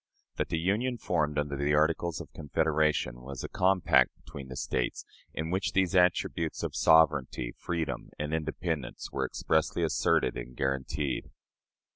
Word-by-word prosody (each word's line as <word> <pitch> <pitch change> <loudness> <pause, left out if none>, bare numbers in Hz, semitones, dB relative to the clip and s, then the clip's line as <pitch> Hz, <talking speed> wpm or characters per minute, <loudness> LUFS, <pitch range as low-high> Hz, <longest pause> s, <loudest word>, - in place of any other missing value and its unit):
That - - -1
the 80 - 0
union 105 +9 0
formed 75 -8 0
under 75 -1 -1
the 70 +2 +1
Articles 80 +2 +1
of - - -10
Confederation 75 -4 0
was 65 0 -7
a - - -3
compact 95 0 +3
between 70 -1 -10
the 65 - -8
States, 60 0 -2 0.3
in 80 +1 -4
which 95 +1 0
these 95 -1 +2
attributes 90 -2 +2
of - - -3
"sovereignty, 70 -6 +3
freedom, 85 -2 -3
and 75 +1 -3
independence," 80 -2 -3
were - - -1
expressly 80 -1 0
asserted - - +2
and - - -7
guaranteed. 65 +1 -2
75 Hz, 145 wpm, -29 LUFS, 70-85 Hz, 0.3 s, compact